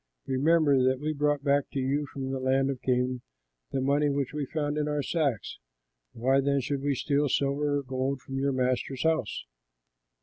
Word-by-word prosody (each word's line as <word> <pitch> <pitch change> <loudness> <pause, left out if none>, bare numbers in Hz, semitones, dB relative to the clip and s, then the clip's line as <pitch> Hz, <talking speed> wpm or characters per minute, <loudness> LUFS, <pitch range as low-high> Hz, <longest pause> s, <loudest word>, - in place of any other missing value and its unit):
Remember 145 0 +3
that 130 0 +2
we 155 +2 -2
brought 145 -1 0
back 140 -1 +2
to 140 - -1
you 140 +3 0
from 135 0 -5
the 135 - -2
land 135 +1 +2
of 130 - -6
Canaan 125 -1 0 0.5
the 135 - -1
money 145 +2 +2
which 140 -1 -1
we 150 -2 -3
found 150 -1 -2
in 150 -1 0
our 150 -1 -1
sacks. 140 - -1 0.5
Why 130 +4 +2
then 140 0 +2
should 140 +1 -2
we 140 0 0
steal 145 +2 +1
silver 145 +2 +1
or 140 - -3
gold 130 +1 -2
from 135 +2 -5
your 140 +1 +1
master's 130 0 -1
house? 160 -8 0
140 Hz, 190 wpm, -28 LUFS, 130-145 Hz, 0.5 s, Remember